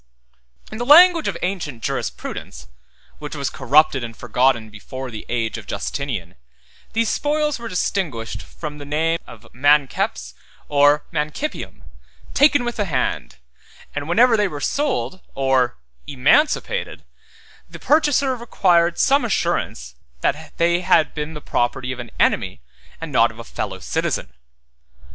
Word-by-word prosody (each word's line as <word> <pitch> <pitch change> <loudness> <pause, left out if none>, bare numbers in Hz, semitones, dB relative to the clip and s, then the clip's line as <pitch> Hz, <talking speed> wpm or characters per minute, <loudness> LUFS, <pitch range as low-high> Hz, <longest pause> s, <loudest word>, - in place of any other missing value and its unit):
In 220 - -7
the - - -1
language 330 +4 +7
of - - -2
ancient 165 - -3
jurisprudence, - - -5 0.5
which 150 0 -7
was 140 -2 -2
corrupted 135 0 +3
and 115 -1 -7
forgotten 125 -2 +1
before 130 +4 -8
the 110 - -8
age 115 -2 -2
of - - -14
Justinian, 110 -12 -4 0.6
these 230 0 +1
spoils 300 0 0
were 235 - -6
distinguished 170 - -2 0.2
by 155 - -3
the 150 0 -10
name 160 +3 0
of - - -13
manceps 135 - +1 0.3
or 145 +1 +4
manicipium, 150 - -4 0.5
taken 285 -3 +4
with 240 - -3
the 205 - 0
hand; 165 - -2 0.6
and 145 +2 -4
whenever 235 +6 +5
they 210 -2 +2
were 150 -5 -6
sold 275 - -1 0.2
or 135 - +1 0.3
emancipated, 290 - +1 0.7
the - - -10
purchaser 290 -3 +2
required 175 -7 +2
some 280 0 +3
assurance 65 - -1 0.3
that - - -2
they 170 +1 +3
had 160 -3 +3
been 150 +1 -5
the 150 - -7
property 125 +1 -1
of 130 - -6
an 120 -1 -7
enemy, - - +1 0.4
and - - -6
not - - +4
of - - -14
a - - -8
fellow - - -5
citizen. 60 - -2
150 Hz, 140 wpm, -21 LUFS, -, 0.7 s, language